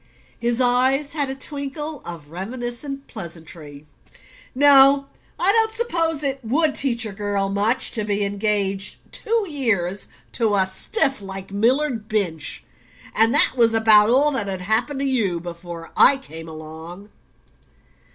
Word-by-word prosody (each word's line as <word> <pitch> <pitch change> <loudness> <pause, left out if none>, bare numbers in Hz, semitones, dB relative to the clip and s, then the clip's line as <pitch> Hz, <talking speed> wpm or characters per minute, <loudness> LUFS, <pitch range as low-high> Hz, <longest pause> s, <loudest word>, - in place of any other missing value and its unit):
His 235 +1 0
eyes 260 +3 +1
had 290 -3 -2
a 265 - -4
twinkle 290 +2 -5
of 160 -4 -9
reminiscent 240 - -6
pleasantry. 160 - -10 0.7
"No 275 0 +6 0.3
I 380 - +4
don't 445 +1 +2
suppose 330 -10 -1
it 270 -1 -3
WOULD 290 +6 +1
teach 240 -4 +1
a 215 - -5
girl 200 -1 -2
much 205 +5 +1
to 220 - -2
be 205 -1 -1
engaged 200 -1 -2 0.2
two 455 -2 0
years 205 - -1 0.2
to 225 -4 0
a 190 -1 +4
stiff 270 - -1
like 195 -1 -8
Millard 235 +2 0
Binch; 180 -8 -2 0.5
and 225 +1 +5
that - - +9
was 230 -2 +3
about 220 -1 +6
all 280 +5 +3
that 230 -8 -2
had 190 -1 -4
happened 230 +8 0
to - - -1
you 220 -10 0
before 170 -1 -9
I 280 - +6
came 165 -11 -11
along." 160 +5 -9
225 Hz, 140 wpm, -21 LUFS, 195-275 Hz, 0.7 s, that